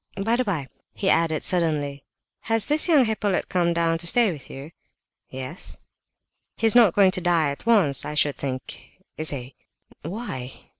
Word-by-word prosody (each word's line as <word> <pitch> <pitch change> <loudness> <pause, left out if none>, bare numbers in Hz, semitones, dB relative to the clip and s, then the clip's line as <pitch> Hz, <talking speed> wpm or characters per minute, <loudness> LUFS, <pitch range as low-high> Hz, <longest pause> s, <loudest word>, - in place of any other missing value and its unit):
By 225 +3 +1
the 255 - 0
by," 170 - -3 0.3
he 195 - +1
added 165 -2 +1
suddenly, 150 -6 0 0.5
"has 225 -1 +2
this 300 +3 +3
young 300 -7 +4
Hippolyte 210 -3 -1
come 175 -2 +1
down 165 -1 0
to 170 - -2
stay 230 +2 +3
with 150 -5 -10
you?" 140 +4 -10 0.6
"Yes." 130 +6 -7 0.8
"He's 225 -1 +3
not 225 -8 +5
going 195 -2 +5
to 185 -1 -2
die 165 -4 +1
at 140 - -10
once, 185 - +4
I 150 - -5
should 145 -1 +2
think, 130 -1 -6 0.3
is 155 0 -1
he?" 130 -2 -6 0.5
"Why?" 165 - -6
170 Hz, 165 wpm, -23 LUFS, 145-210 Hz, 0.8 s, not